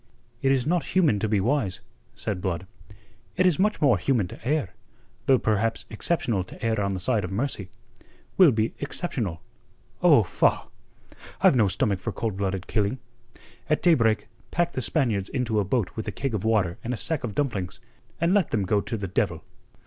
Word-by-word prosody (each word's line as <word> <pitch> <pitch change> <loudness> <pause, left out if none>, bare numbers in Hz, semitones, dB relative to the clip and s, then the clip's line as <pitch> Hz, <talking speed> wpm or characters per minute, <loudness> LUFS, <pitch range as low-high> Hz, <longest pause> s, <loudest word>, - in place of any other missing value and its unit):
"It 135 - +3
is 130 -2 +2
not 170 +2 +1
human 155 - +4
to 110 - -1
be 105 -1 +2
wise," 115 -3 0 0.4
said 95 -3 -3
Blood. 95 -1 -2 0.7
"It 185 - +3
is 180 -3 +3
much 210 +2 +2
more 130 -10 +4
human 115 -2 +1
to - - -10
err, 130 -7 0 0.5
though 135 - +6
perhaps 110 0 0
exceptional 115 - 0
to 95 - -8
err 110 -2 +1
on 100 -1 -1
the - - -3
side 105 +2 +1
of 90 - -4
mercy. 100 -3 -2 0.7
We'll 185 -4 +7
be 110 -1 0
exceptional. 125 - -3 0.6
Oh, - - +6
faugh! - - +1 0.7
I've - - +6
no 110 -5 +4
stomach 95 +1 0
for - - -3
cold 115 -4 -3
blooded 95 -1 -2
killing. 105 +2 0 0.7
At 155 - +1
daybreak 115 -11 +3 0.2
pack 175 0 0
the 130 - -3
Spaniards 115 - 0
into 120 -5 0
a - - +2
boat 100 0 -1
with 110 - -5
a - - -1
keg 135 -3 -3
of 105 -3 -2
water 105 -6 +1
and 125 +2 -2
a - - -7
sack 160 +2 -1
of 110 -4 -4
dumplings, 105 -11 -2 0.4
and 170 +2 +2
let 205 -3 +3
them 105 -3 0
go 100 +2 +2
to 115 - -4
the 100 -2 -4
devil." 90 - -1
110 Hz, 190 wpm, -26 LUFS, 100-135 Hz, 0.7 s, We'll